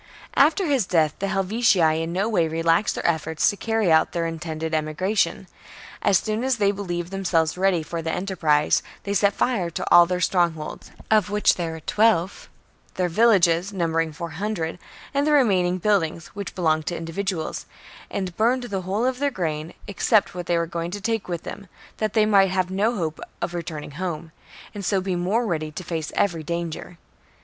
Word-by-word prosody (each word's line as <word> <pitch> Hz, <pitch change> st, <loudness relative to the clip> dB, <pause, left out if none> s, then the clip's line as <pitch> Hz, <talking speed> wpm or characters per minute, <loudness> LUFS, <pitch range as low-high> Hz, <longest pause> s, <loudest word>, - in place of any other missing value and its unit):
5. 275 Hz, -, +7 dB
After 370 Hz, +5 st, -2 dB
his 270 Hz, -, +1 dB
death 155 Hz, -4 st, +2 dB
the 200 Hz, -, -1 dB
Helvetii 195 Hz, -5 st, +2 dB
in 165 Hz, +1 st, -3 dB
no 190 Hz, +4 st, 0 dB
way 200 Hz, -7 st, +2 dB
continued 160 Hz, +1 st, -3 dB
relaxed 165 Hz, +5 st, +3 dB
their -, -, -5 dB
efforts 160 Hz, -2 st, +1 dB
to -, -, -8 dB
carry 225 Hz, -3 st, 0 dB
out 160 Hz, -, +4 dB
their 170 Hz, -1 st, -1 dB
intended 160 Hz, -1 st, -4 dB
Ke'^"°"^ -, -, +1 dB
emigration. 185 Hz, +7 st, -1 dB, 0.5 s
As 195 Hz, -, +4 dB
soon 215 Hz, +4 st, -2 dB
as 260 Hz, -2 st, +1 dB
they 200 Hz, -2 st, +3 dB
believed 175 Hz, -3 st, -4 dB
themselves 175 Hz, -5 st, +1 dB
theiramel? -, -, -14 dB
ready 190 Hz, -4 st, +2 dB
for 165 Hz, +1 st, -4 dB
the 160 Hz, 0 st, -2 dB
enterprise, 160 Hz, -6 st, +1 dB, 0.2 s
they 200 Hz, -, -2 dB
set 200 Hz, 0 st, +3 dB
fire 205 Hz, -9 st, 0 dB
to 165 Hz, -, -4 dB
all 175 Hz, 0 st, +8 dB
their 180 Hz, 0 st, -1 dB
strongholds, 170 Hz, -4 st, -1 dB, 0.2 s
of 215 Hz, -3 st, +4 dB
which 210 Hz, +1 st, +3 dB
there 165 Hz, -2 st, -3 dB
were 160 Hz, -, -8 dB
twelve, 205 Hz, -1 st, +1 dB, 0.5 s
their 180 Hz, -1 st, 0 dB
villages, 185 Hz, -3 st, +3 dB
numbering 165 Hz, -4 st, 0 dB
four 170 Hz, +1 st, -6 dB
hundred, 175 Hz, -1 st, -3 dB, 0.3 s
and 280 Hz, +1 st, +1 dB
the 305 Hz, -, +3 dB
remain 200 Hz, -11 st, +4 dB
ing 180 Hz, +1 st, -1 dB
buildings, 170 Hz, -5 st, 0 dB
which 200 Hz, -2 st, -7 dB
belonged 155 Hz, -3 st, +1 dB
to 175 Hz, -, -2 dB
individuals; 165 Hz, 0 st, -4 dB, 0.4 s
and 185 Hz, -3 st, -4 dB
burned 245 Hz, +3 st, +2 dB
the 200 Hz, -6 st, -3 dB
whole 195 Hz, +6 st, -1 dB
of 255 Hz, 0 st, -1 dB
their 285 Hz, 0 st, +2 dB
grain, 160 Hz, -, -3 dB
except 200 Hz, +2 st, +2 dB
what 175 Hz, -1 st, -6 dB
they 170 Hz, -, +2 dB
were 170 Hz, -, +1 dB
going 170 Hz, 0 st, -4 dB
to 205 Hz, +3 st, -5 dB
take 225 Hz, +1 st, -2 dB
with 170 Hz, -2 st, -3 dB
them, 200 Hz, -1 st, -8 dB, 0.3 s
that 215 Hz, -2 st, -1 dB
they 215 Hz, -2 st, +4 dB
might 200 Hz, -2 st, +4 dB
have 185 Hz, -1 st, -1 dB
no 210 Hz, +5 st, +1 dB
hope 160 Hz, -5 st, -3 dB, 0.2 s
of 175 Hz, 0 st, -3 dB
returning 155 Hz, -4 st, -5 dB
home, 165 Hz, 0 st, -5 dB, 0.4 s
and 205 Hz, -2 st, -6 dB
so 195 Hz, +1 st, +1 dB
be 185 Hz, -1 st, -2 dB
more 195 Hz, +7 st, 0 dB
ready 155 Hz, -6 st, -2 dB
to 185 Hz, -, -7 dB
face 160 Hz, -3 st, -4 dB
every 170 Hz, -5 st, +1 dB
danger. 170 Hz, +1 st, -5 dB
180 Hz, 200 wpm, -23 LUFS, 165-205 Hz, 0.5 s, all